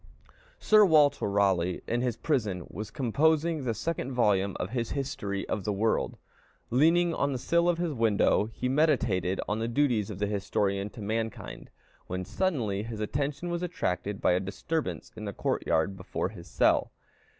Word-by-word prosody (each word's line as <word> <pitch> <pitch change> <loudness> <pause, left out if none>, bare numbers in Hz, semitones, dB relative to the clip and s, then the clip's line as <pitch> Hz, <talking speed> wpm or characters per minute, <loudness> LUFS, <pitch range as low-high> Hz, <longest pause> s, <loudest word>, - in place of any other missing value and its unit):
Sir 215 -1 +5
Walter 150 - +4
Raleigh, 95 -3 +1
in 120 +1 0
his 125 -3 -1
prison, 105 - -1
was 105 0 -6
composing 155 +6 +1
the 115 -2 -1
second 135 +2 -3
volume 100 -5 +2
of 95 - -3
his 120 -2 -2
History 105 -8 -3
of 100 - -2
the 105 - -1
World. 110 +3 0 0.5
Leaning 165 +7 +4
on 140 -2 0
the - - -2
sill 170 +7 +2
of 175 - +2
his 170 -3 -1
window, 110 -2 +2
he 125 - -3
meditated 120 - +1
on 105 +1 -1
the 115 - -1
duties 120 -5 +1
of 105 - -6
the 105 - 0
historian 100 0 -1
to 110 0 -9
mankind, 110 +1 -4 0.4
when 90 +1 -3
suddenly 120 - -1
his 110 0 -6
attention 140 +9 -2
was 175 0 -2
attracted 105 - -2
by - - +3
a 90 - +3
disturbance 100 +12 -3
in 110 - -7
the 100 - -4
court - - -2
yard 80 +5 +1
before 95 -1 -3
his 90 -5 -11
cell. - - +2
115 Hz, 175 wpm, -28 LUFS, 100-145 Hz, 0.5 s, Sir